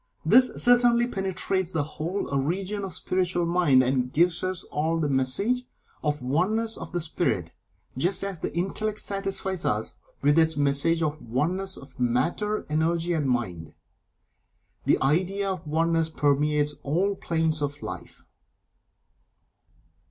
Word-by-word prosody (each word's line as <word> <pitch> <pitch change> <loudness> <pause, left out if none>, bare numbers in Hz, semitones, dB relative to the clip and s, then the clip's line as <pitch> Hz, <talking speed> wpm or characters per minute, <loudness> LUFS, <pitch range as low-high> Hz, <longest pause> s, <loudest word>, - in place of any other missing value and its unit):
This 255 0 +7
certainly 240 -1 +4
penetrates 190 -4 -2
the 160 -3 0
whole 165 +6 -4
region 185 +9 -1
of 195 - -3
the - - -4
Spiritual 180 -1 0
Mind, 170 -7 +4
and 125 0 0
gives 170 +4 +2
us 185 -1 -1
all 160 +2 -1
the 155 - 0
message 145 - +2 0.4
of 150 -3 -1
Oneness 210 - +1
of - - -8
the 175 - -1
Spirit, 155 - -1 0.4
just 175 +9 +1
as 195 -4 -4
the - - -3
Intellect 210 +4 -2
satisfies 195 -2 -2
us - - -1 0.3
with 145 +3 +4
its 160 -1 +2
message 145 +4 +2
of 155 0 -2
the - - -14
Oneness 175 +11 -1
of 135 -2 -13
Matter, 150 - 0
Energy, 165 +3 0
and 150 -5 0
Mind. 90 -10 -3 1.1
The - - +3
idea 190 +7 +1
of 185 -4 -6
Oneness 165 +1 +1
permeates 150 0 +1
all 180 +8 0
planes 160 -4 -1
of 145 0 -3
Life. - - -8
165 Hz, 140 wpm, -26 LUFS, 145-190 Hz, 1.1 s, This